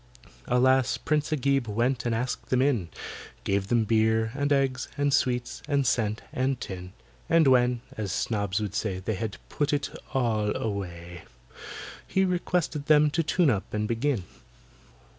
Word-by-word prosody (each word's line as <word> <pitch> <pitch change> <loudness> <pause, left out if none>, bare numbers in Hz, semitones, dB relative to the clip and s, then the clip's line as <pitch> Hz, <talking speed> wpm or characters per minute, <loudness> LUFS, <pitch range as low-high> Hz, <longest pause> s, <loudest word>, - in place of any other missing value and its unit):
Alas! 130 +1 +3
PRINCE 150 0 0
AGIB 135 -3 +1
went 120 +3 0
and 115 - +1
asked 125 +2 -3
them 130 - +2
in; 120 -12 +1 0.5
Gave 100 0 0
them 120 +1 +3
beer, 110 0 +2
and 145 +1 -1
eggs, 135 -2 +1
and 145 -1 +1
sweets, 125 -2 0
and 140 -2 +1
scent, 110 -3 0
and 130 -2 0
tin. 90 -3 -7 0.4
And 165 -1 +5
when 125 -2 +4 0.2
(as 105 -3 -3
snobs 100 -1 -1
would 105 -3 -3
say) 105 -3 -1
They 95 +4 -3
had 110 0 -4
"put 145 -1 -1
it 145 -1 -1 0.2
all 110 -5 +1
away," 90 -5 -5 0.8
He 190 0 +2
requested 175 -4 -1
them 150 -1 +5
to 165 - +1
tune 160 -1 +3
up 100 -3 -3
and 105 0 -1
begin. 115 -1 0
120 Hz, 155 wpm, -27 LUFS, 105-140 Hz, 0.8 s, And